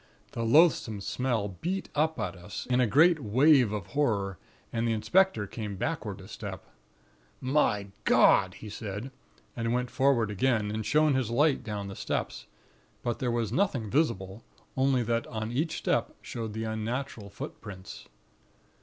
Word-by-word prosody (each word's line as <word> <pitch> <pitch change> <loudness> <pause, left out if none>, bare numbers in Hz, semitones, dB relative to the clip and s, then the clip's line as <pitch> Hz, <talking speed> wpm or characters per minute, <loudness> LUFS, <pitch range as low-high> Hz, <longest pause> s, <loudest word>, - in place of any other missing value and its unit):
The 115 - -4
loathsome 115 -4 +4
smell 115 0 -1
beat 190 +3 -2
up 155 +2 +1
at 90 - -2
us, 90 +2 -7
in 125 - +3
a 125 - +3
great 160 - +5
wave 130 +1 +4
of 105 -4 -3
horror, 100 - -1 0.3
and 115 0 0
the 115 - +2
inspector 180 - +2
came 105 0 -5
backward 105 - -3
a 95 - -12
step. 100 -3 -7 0.7
"'My 130 -7 +1
God!' - - +5
he 110 - -10
said, 105 +3 -6 0.4
and 115 -1 -1
went 125 0 -1
forward 130 -5 +2
again, 105 0 +1
and 110 +1 -2
shone 150 +4 +3
his 130 -4 0
light 145 +4 +2
down 105 -2 -4
the 95 - -7
steps; - - -3 0.6
but 120 -1 -2
there 125 - 0
was 115 -3 -1
nothing 130 - 0
visible, 115 - 0 0.3
only 130 -2 +2
that 115 +1 -1
on 110 -1 -4
each 150 +7 -1
step - - 0
showed 110 -3 -5
the 110 +1 -3
unnatural 110 0 -4
footprints. 100 -1 -9
115 Hz, 155 wpm, -29 LUFS, 105-135 Hz, 0.7 s, great